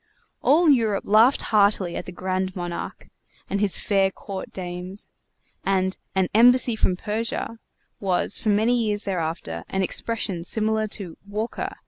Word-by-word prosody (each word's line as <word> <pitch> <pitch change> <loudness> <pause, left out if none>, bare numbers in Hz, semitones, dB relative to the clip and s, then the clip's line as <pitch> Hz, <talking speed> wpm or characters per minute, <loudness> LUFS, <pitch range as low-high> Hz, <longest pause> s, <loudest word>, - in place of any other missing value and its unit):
All 325 +4 +4
Europe 225 -8 +3
laughed 225 +6 +5
heartily 200 -4 +3
at - - -4
the - - -7
Grand 185 +1 -2
Monarque 175 -2 -6 0.4
and 200 - -1
his 205 -3 +3
fair 195 -2 +2
court 190 0 -8
dames, 180 +1 -5 0.5
and 190 -1 +1 0.2
"An 190 -1 +2
Embassy 245 +1 +6
from 185 -4 +1
Persia" 225 +3 -3 0.4
was 190 0 +2
for 220 - -1
many 225 +4 +3
years 210 -1 -1
thereafter 160 - -3
an 190 0 0
expression 190 -3 -2
similar 220 +2 +1
to 195 -5 -6
"Walker!" 215 +3 -4
200 Hz, 140 wpm, -24 LUFS, 185-220 Hz, 0.5 s, Embassy